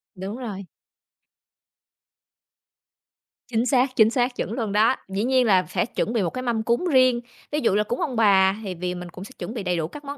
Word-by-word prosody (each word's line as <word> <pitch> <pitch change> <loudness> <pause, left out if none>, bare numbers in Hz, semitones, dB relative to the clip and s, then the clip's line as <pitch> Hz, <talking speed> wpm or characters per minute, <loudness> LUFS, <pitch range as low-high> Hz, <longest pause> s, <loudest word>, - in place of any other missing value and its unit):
Đúng 195 +5 -6
rồi. 205 -6 -6 2.8
Chính 235 0 0
xác, 255 0 +2
chính 220 -1 +5
xác, 245 +1 0
chuẩn - - -3
luôn 225 -5 -3
đó, 220 +5 +3
dĩ 195 +3 -2
nhiên 255 0 +3
là 185 -5 +3
sẽ - - 0
chuẩn 230 -1 -3
bị 225 - +1
một 170 - 0
cái 255 - -5
mâm 235 -3 -1
cúng 235 +10 0
riêng. 255 -2 +4 0.3
Ví 300 - 0
dụ 230 - +2
là 210 - +3
cúng 235 +3 -4
ông 260 -5 -2
bà 195 -3 +4
thì 190 -2 -4
vì 180 +1 -3
mình 180 0 -7
cũng 185 +2 -10
sẽ 215 - -11
chuẩn 225 - -5
bị 215 -5 -5
đầy 180 -2 -1
đủ 160 -1 -1
các 290 - -11
món 285 +1 -6
225 Hz, 220 wpm, -24 LUFS, 195-255 Hz, 2.8 s, chính